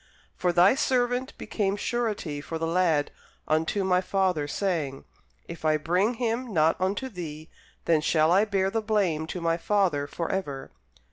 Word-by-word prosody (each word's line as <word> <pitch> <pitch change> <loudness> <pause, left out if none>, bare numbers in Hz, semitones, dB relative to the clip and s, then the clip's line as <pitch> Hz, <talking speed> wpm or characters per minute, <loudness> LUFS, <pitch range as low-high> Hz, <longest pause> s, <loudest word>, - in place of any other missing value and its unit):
For 180 - +1
thy 175 +4 +5
servant 250 -1 0
became 200 -2 -1
surety 205 -10 -2
for 165 +2 -5
the 165 - -2
lad 165 -3 +1 0.4
unto 160 +6 +1
my 180 -1 +2
father, 185 -5 0
saying, 155 -6 -2 0.4
If 170 -1 -9
I 155 -1 +3
bring 180 +9 +1
him 235 +1 -2
not 160 -3 +3
unto 200 +8 -1
thee, 160 -7 -8 0.3
then 160 -2 +3
shall 155 0 +3
I 195 +4 +5
bear 195 -2 0
the 225 - 0
blame 190 -8 0
to 180 - -5
my 165 -1 0
father 175 -6 +1
for 170 +3 -4
ever. 145 -9 -4
180 Hz, 160 wpm, -27 LUFS, 160-205 Hz, 0.4 s, thy